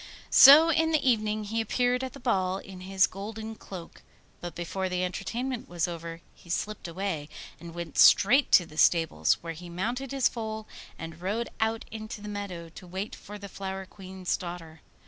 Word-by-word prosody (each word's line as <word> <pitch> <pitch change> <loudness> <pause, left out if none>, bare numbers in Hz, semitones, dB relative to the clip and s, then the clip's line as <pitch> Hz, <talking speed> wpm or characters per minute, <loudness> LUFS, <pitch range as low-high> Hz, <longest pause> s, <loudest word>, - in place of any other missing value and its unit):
So 305 +5 +9
in 320 0 +2
the 305 -3 +1
evening 215 -3 +1
he 225 +2 -1
appeared 245 +3 +1
at 260 - -5
the 275 - -10
ball 190 -7 0
in 190 -1 -10
his 190 0 +3
golden 220 +3 -7
cloak; 185 -5 -10 0.4
but 175 -2 -7
before 185 +2 -3
the 180 0 -1
entertainment 240 +7 -3
was 175 -1 -1
over 165 -1 -7
he 175 - -19
slipped 210 +3 -3
away, 170 -4 -4 0.3
and 170 0 -10
went 170 -3 -5
straight 255 +8 +6
to 175 - +7
the 155 -1 -8
stables, 165 -2 +4
where 165 -1 -5
he 175 +2 -10
mounted 235 +10 -3
his 275 -2 +3
foal 220 -2 -5 0.3
and 165 0 -8
rode 215 +6 -2
out 220 0 0
into 215 -1 -7
the 210 - -9
meadow 200 -5 -5
to 180 +2 -12
wait 190 +4 -5
for 210 +1 -9
the 200 -1 -8
Flower 190 0 -6
Queen's 185 -1 -4
daughter. 170 -3 -8
195 Hz, 185 wpm, -28 LUFS, 175-225 Hz, 0.4 s, So